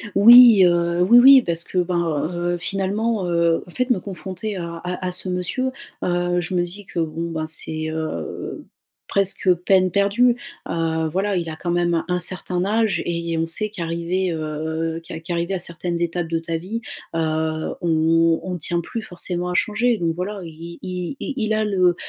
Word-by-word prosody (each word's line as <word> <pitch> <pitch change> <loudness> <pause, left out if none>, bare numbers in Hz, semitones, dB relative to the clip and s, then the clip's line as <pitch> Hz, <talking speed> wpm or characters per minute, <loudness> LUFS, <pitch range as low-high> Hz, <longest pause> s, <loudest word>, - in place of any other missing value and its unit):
Oui, 230 -1 +9
heu, 170 0 +2
oui 235 +7 +6
oui 265 +1 +9
parce 170 -4 -2
que 185 - -6
ben, 170 -4 0
heu, 175 0 -1
finalement, 195 +3 -1
heu, 170 -1 +1
en - - -13
fait 255 +5 -1
me 225 -7 +2
confronter 195 +2 -6
à 170 -2 -5
à 180 +2 -5
à - - -2
ce 185 +1 -2
monsieur, 180 +9 -2 0.3
heu, 175 0 0
je 175 +2 -5
me 175 - +2
dis 190 +3 -7
que 170 - -5
bon 165 +1 -3
ben, 155 -1 -3
c'est, 155 0 -3
heu, 160 0 -5 0.4
presque 195 -1 0 0.2
peine 185 -1 +4
perdue, 205 +6 +3 0.3
heu, 160 -1 -1
voilà, 195 +1 0
il 165 -2 -2
a 155 - -5
quand 175 +2 -3
même 175 -1 +1
un 180 0 +1
certain 180 0 -1
âge 220 0 +1
et 170 -1 -2
et 165 - -1
on 165 0 0
sait 215 +6 -1
qu'arrivé, 175 0 -2
heu, 160 +1 -3
qu 160 - -7
qu'arrivé 170 +2 -2
à 185 - -1
certaines 170 0 -3
étapes 170 0 -1
de 165 0 -1
ta 165 0 -3
vie, 210 +8 -5 0.3
heu, 160 -1 -1
on 165 0 +3
on 180 -1 -4
tient 170 +2 -1
plus 225 +6 -5
forcément 180 -1 -3
à - - -2
changer 230 +4 +1
donc 165 -2 0
voilà. 195 +2 -4
I 165 +1 -9
i 180 +6 -4
i 285 - -4
il 215 -2 0
a 215 0 +1
le, 185 -4 +2
175 Hz, 190 wpm, -22 LUFS, 165-195 Hz, 0.4 s, Oui